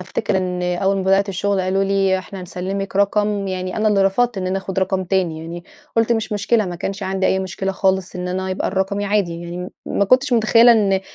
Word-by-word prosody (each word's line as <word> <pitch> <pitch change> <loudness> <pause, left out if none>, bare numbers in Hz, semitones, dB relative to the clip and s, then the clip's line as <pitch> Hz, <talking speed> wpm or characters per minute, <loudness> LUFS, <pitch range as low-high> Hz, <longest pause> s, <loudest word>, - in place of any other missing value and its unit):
أفتكر 190 +2 -2
إن 180 -1 -2
أول 180 +2 0
ما 195 - -1
بدأت 195 +1 +2
الشغل 195 +1 0
قالوا 190 +1 +1
لي: 195 -1 +2
"إحنا 190 +1 -9
هنسلِّمِك 190 +2 -4
رقم." 205 0 +1
يعني 185 0 -4
أنا 215 0 +2
اللي 200 -2 +3
رفضت 220 +3 +1
إن 185 - -3
أنا 185 +1 0
آخُد 190 -1 -5
رقم 190 0 0
تاني 180 -3 0
يعني. 170 +2 -8 0.3
قُلت: 225 +1 +3
"مش 220 -1 -2
مشكلة." 210 +2 +1
ما 175 -1 -5
كانش 195 +4 -4
عندي 190 0 0
أي 190 - +2
مشكلة 190 +1 -3
خالص 190 -1 0
إن 180 0 -4
أنا 190 +1 -2
يبقى 185 - -1
الرقم 195 +1 -1
عادي. 195 -5 0
يعني 170 0 -7
م 180 0 -5 0.2
ما 200 - +1
كنتش 255 +6 +3
مُتخيّلة 230 +1 +6
إن 195 -4 +2
195 Hz, 220 wpm, -20 LUFS, 185-200 Hz, 0.3 s, مُتخيّلة